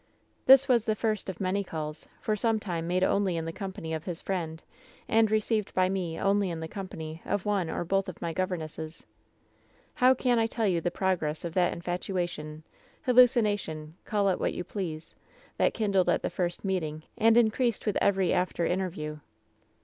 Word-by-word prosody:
"This 270 +1 +8
was 240 -5 +4
the 215 - +1
first 215 -2 -1
of 185 - -6
many 195 +1 0
calls 155 -3 -6
— - - -31
for 215 - +1
some 225 +1 +1
time 170 -5 -3
made 180 +1 +1
only 190 -3 +2
in 165 - -3
the 165 - -3
company 190 -5 -5
of 160 -1 -3
his 175 -2 -4
friend, 165 -4 -3 0.4
and 225 -1 +4
received 215 -1 0
by 185 0 +3
me 180 -4 -2
only 200 -1 +2
in 165 -1 -4
the 160 - -4
company 165 -4 -7
of 200 - -2
one 200 -5 0
or 160 - -2
both 195 +2 0
of 180 - -9
my 170 -1 -3
governesses. 160 -3 -4 0.9
"How 255 +1 +5
can 245 -2 +2
I 225 - +2
tell 225 0 -1
you 175 -3 +1
the 175 - 0
progress 175 -4 -1
of 170 - -4
that 180 -1 +3
infatuation, 175 -3 -4 0.4
hallucination 210 - +3
— - - -41
call 205 -2 +1
it 185 - 0
what - - -1
you - - -3
please 170 -4 -5 0.2
— - - -28
that - - +3
kindled 200 -4 +2
at - - +2
the - - -1
first 175 +1 -2
meeting, 160 -5 -2
and 225 0 +4
increased 235 0 +2
with 210 - 0
every 190 -3 +3
after 180 -2 0
in 180 - +1
terview 155 -5 -4
185 Hz, 195 wpm, -28 LUFS, 165-210 Hz, 0.9 s, This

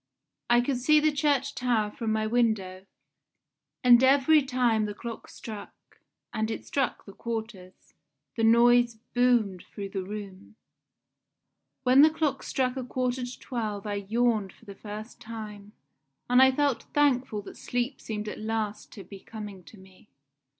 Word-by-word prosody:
I 240 0 +5
could 255 +1 -1
see 305 +5 +4
the 305 0 +3
church 285 -1 +1
tower 230 -4 0
from 225 -1 -3
my 215 0 0
window, 215 -5 0 1.0
and 245 0 +7
every 280 +3 +5
time 250 -5 +1
the 205 -1 -5
clock 230 +1 -7
struck 215 -3 -11 0.3
and 220 0 -1
it 225 - -5
struck 270 -4 -2
the 200 - -11
quarters 220 -6 -7 0.4
the 225 - -1
noise 235 +1 +5 0.2
boomed 240 -7 +2
through 200 -1 -6
the 195 -1 -3
room. 200 +1 -8 1.3
"When 260 +2 +6
the 310 - +8
clock 310 -2 -1
struck 255 -1 -1
a 260 - -3
quarter 250 0 -2
to 245 - -9
twelve 215 -5 -4
I 200 -1 -4
yawned 225 -4 +1
for - - -22
the 200 - -9
first 215 +3 -9
time, 210 -3 -8 0.6
and 250 +1 +5
I 265 0 +7
felt 280 -1 0
thankful 260 -7 +2
that - - -11
sleep 245 +2 -3
seemed 215 -1 -5
at - - -6
last 215 -1 -3
to 200 - -9
be 195 0 -11
coming 205 -3 -9
to 220 - -14
me. 190 +2 -19
230 Hz, 155 wpm, -27 LUFS, 210-250 Hz, 1.3 s, the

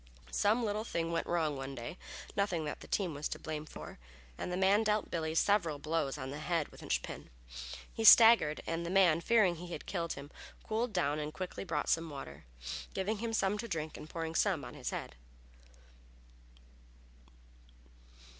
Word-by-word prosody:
Some 220 +4 +2
little 210 0 -1
thing 170 -6 -2
went 170 - -1
wrong 160 -4 +1
one 135 0 -5
day, 120 +9 -7 0.4
nothing 185 -6 0
that 150 - -4
the - - -11
team 185 -5 0
was 145 +1 -3
to - - -4
blame 155 -1 -5
for, - - -9 0.4
and 180 - -4
the 180 - -1
man 195 +3 +4
dealt 215 -1 0
Billy 160 -1 -2
several 170 -5 +3
blows 155 -1 -1
on 130 -1 -5
the 145 - -5
head 165 -1 -1
with - - -14
a - - -9
linch - - 0
pin. - - -8 0.6
He 225 - -3
staggered, 225 -9 +8
and 165 +1 -2
the 170 - -3
man, 180 -4 +5
fearing 200 -5 +4
he 175 +1 -7
had - - -6
killed 170 -3 -2
him, 140 +1 -9 0.3
cooled 225 +2 -1
down 155 -6 +1
and 150 0 -3
quickly 185 +3 -5
brought 160 -6 -2
some 165 0 +1
water, 75 - -8 0.5
giving 200 +3 -1
him 230 0 -2
some 210 -2 +1
to 235 - -4
drink 160 -5 -3
and 155 - -9
pouring 165 -1 -4
some 180 -3 +1
on - - -8
his 135 -4 -4
head. - - -5
170 Hz, 185 wpm, -33 LUFS, 155-200 Hz, 0.6 s, staggered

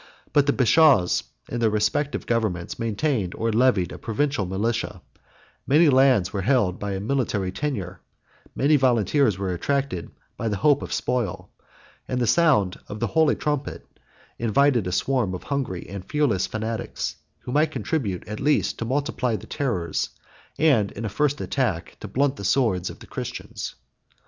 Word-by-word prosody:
But 145 -1 +4
the 145 - +4
bashaws, 130 - +4 0.2
in 120 - -4
their 115 -1 +3
respective 105 +8 0
governments, 110 -8 -1
maintained 115 - -1
or 115 0 -1
levied 110 -7 +3
a - - -8
provincial 115 -2 -1
militia; 105 +1 -2 0.7
many 150 +4 +5
lands 130 -8 +4
were 100 - -1
held 105 -5 +2
by 100 -1 -3
a 95 - -2
military 105 -4 -1
tenure; 95 -10 -4 0.5
many 145 +2 +4
volunteers 125 -3 +2
were 95 -2 -2
attracted 135 - -2 0.3
by 115 - -2
the 105 - 0
hope 145 +6 +3
of - - -6
spoil 120 -8 -2 0.6
and 125 - -1
the 120 - +2
sound 105 - +3
of 105 - -7
the 120 - +1
holy 160 -2 +4
trumpet 145 -2 -3 0.5
invited 120 -1 +2
a - - -2
swarm 115 -2 0
of - - -8
hungry 130 -11 -3
and 100 0 -7
fearless 145 -11 +1
fanatics, 110 +1 -4 0.2
who - - -7
might 150 +4 +3
contribute 110 - -3
at 105 +1 -5
least 145 +1 +1
to 115 - -2
multiply 130 -2 -1
the - - -7
terrors, 95 - -2 0.5
and 135 -11 +3
in 115 - -5
a - - -2
first 145 +7 0
attack 115 -12 -2
to - - -7
blunt 140 +1 0
the - - -7
swords, 100 -5 +1
of - - -9
the - - -13
Christians. - - -6
115 Hz, 165 wpm, -24 LUFS, 100-140 Hz, 0.7 s, many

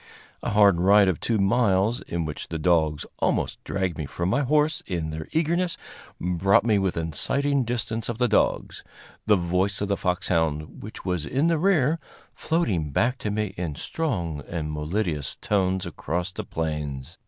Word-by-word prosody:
A - - -2
hard 100 -4 +5
ride 100 +2 +6
of 95 - +1
two 115 - 0
miles, 100 +1 +2
in 85 -1 -2
which 75 - -5
the 80 - -4
dogs 80 -2 +2
almost - - 0
dragged 95 -4 -2
me 75 - -3
from 85 +4 -2
my 140 - +2
horse 150 +4 +2
in 85 -4 -2
their 80 0 -5
eagerness, 170 +2 +1 0.4
brought 90 +3 +3
me 110 -3 +3
within 85 -4 -1
sighting 140 - +1
distance 115 -1 -2
of 120 - -3
the 125 0 +2
dogs 105 - +1 0.4
the 105 - +6
voice 90 +2 0
of 100 - -2
the 100 - +2
foxhound, 80 -4 -1
which 105 - -9
was 90 -4 -1
in 135 - 0
the 165 -2 +2
rear, 165 -4 +3 0.3
floating 105 - 0
back 120 - +1
to 105 - -2
me 105 -1 -2
in 85 -4 -3
strong 85 - -2
and 80 -3 -3
melodious 75 -2 -2
tones 95 -5 0
across 90 +4 -3
the 90 - -5
plains. 75 -5 -4
95 Hz, 170 wpm, -25 LUFS, 80-120 Hz, 0.4 s, ride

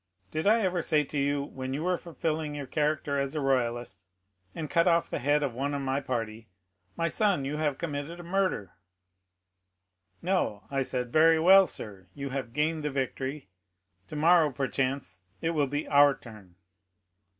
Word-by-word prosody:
Did 155 +4 -1
I 225 +2 +5
ever 180 -3 0
say 155 -2 +2
to 145 - -6
you, 140 0 +1
when 130 -1 -5
you 150 - -3
were 180 +1 +2
fulfilling 160 -3 -3
your 145 -1 -4
character 150 0 0
as 140 +2 -2
a - - 0
royalist, 120 -7 -1 0.5
and 160 -2 -4
cut 170 +3 +2
off 170 -1 +2
the - - -1
head 145 +3 +2
of 135 -4 -1
one 140 +4 -2
of 140 - -2
my 135 +1 0
party, 115 -4 -4 0.5
'My 165 0 +1
son, 180 -5 +1
you 145 +2 -3
have 150 -3 0
committed 155 +1 -4
a - - -8
murder?' 185 - -1 1.5
No, 175 - 0
I 135 -1 0
said, 125 -2 -3
'Very 160 +1 +6
well, 190 +3 +7
sir, 100 -9 -8
you 140 -1 -5
have 130 -3 -4
gained 155 +4 0
the 150 - -1
victory; 135 -1 -3 0.6
tomorrow, 160 - +4
perchance, 130 -7 -2 0.2
it 165 - 0
will 150 -4 +1
be 145 +2 -3
our 145 -1 +6
turn. 105 -9 -14
145 Hz, 175 wpm, -28 LUFS, 130-160 Hz, 1.5 s, well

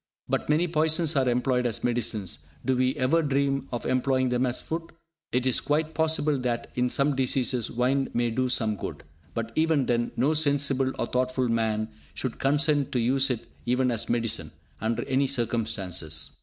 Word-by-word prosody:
But - - -1
many 160 +4 +3
poisons 160 0 +2
are 130 -2 +3
employed 125 0 +1
as 115 - -4
medicines; 115 -6 -1 0.3
do 130 - +2
we 130 +2 +1
ever 150 +4 +2
dream 140 -2 0
of 120 - -4
employing 130 0 +1
them 125 +1 +1
as 125 - -2
food? 165 +1 -5 0.4
It 125 +1 +1
is 130 - +4
quite 155 +2 0
possible 155 -3 +1
that, 120 -2 -2
in 125 0 +1
some 140 +2 +1
diseases, 130 -2 +1
wine 130 +3 +1
may 120 0 0
do 130 +2 0
some 110 -4 +1
good, - - -6 0.3
but 115 0 -3
even 155 -2 +2
then, 120 -1 0
no 145 +5 +3
sensible, 140 -3 +2
or - - 0
thoughtful 130 0 0
man 110 -1 0 0.3
should 130 -3 -4
consent 145 +1 +2
to 125 - +2
use 135 +4 +2
it 120 -3 -2 0.2
even 125 +1 +2
as 115 -1 -2
medicine, 115 -1 -1 0.3
under 110 +2 0
any 135 0 +1
circumstances. 100 - -2
130 Hz, 175 wpm, -27 LUFS, 120-140 Hz, 0.4 s, is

